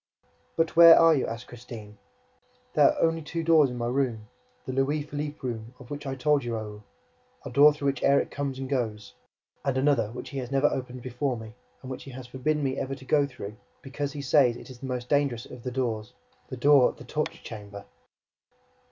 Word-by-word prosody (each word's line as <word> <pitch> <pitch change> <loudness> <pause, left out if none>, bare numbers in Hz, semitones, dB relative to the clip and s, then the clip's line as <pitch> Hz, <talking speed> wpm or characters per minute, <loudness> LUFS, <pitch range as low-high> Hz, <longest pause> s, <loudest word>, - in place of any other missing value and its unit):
"But 165 -1 0
where 170 0 +10
are 165 -1 +7
you?" 140 - 0
asked 115 +2 -6
Christine. 115 -3 -10 0.8
"There - - +6
are - - -4
only 165 0 +2
two 165 +2 -4
doors 160 -4 +5
in 125 - -6
my 120 - -2
room, 120 -4 -1 0.4
the 130 - -4
Louis 140 +3 0
Philippe 145 0 -5
room 115 -1 -5
of 125 0 -14
which 145 0 -6
I 135 - -3
told 145 +2 +2
you, 120 -1 -3
Raoul; 105 -1 -7 0.6
a - - -6
door 145 +2 +7
through 145 -1 -6
which 135 -2 -3
Erik 140 0 +3
comes 140 -2 -3
and 135 0 -5
goes, 110 - -3 0.5
and 135 -2 0
another 130 -6 +2
which 125 - -8
he 140 - -4
has 125 -2 -5
never 135 +1 +1
opened 125 -3 -2
before 130 +1 -2
me 110 -1 -9 0.3
and 130 - -7
which 130 - -7
he - - -9
has 130 0 -8
forbidden 145 +5 -1
me 135 0 -1
ever 135 0 -3
to 135 - -14
go 145 0 +3
through, 105 -5 -9 0.3
because 140 +1 -4
he 145 -2 -6
says 130 -3 +4
it - - -11
is 125 - -12
the 135 - -6
most 125 -1 -4
dangerous 140 -5 +1
of 125 - -11
the 125 - -4
doors, 115 -4 -3 0.3
the 130 - -7
door 140 0 +6
of - - -11
the - - -11
torture 155 0 -4
chamber!" 100 -2 -9
130 Hz, 215 wpm, -27 LUFS, 120-145 Hz, 0.8 s, where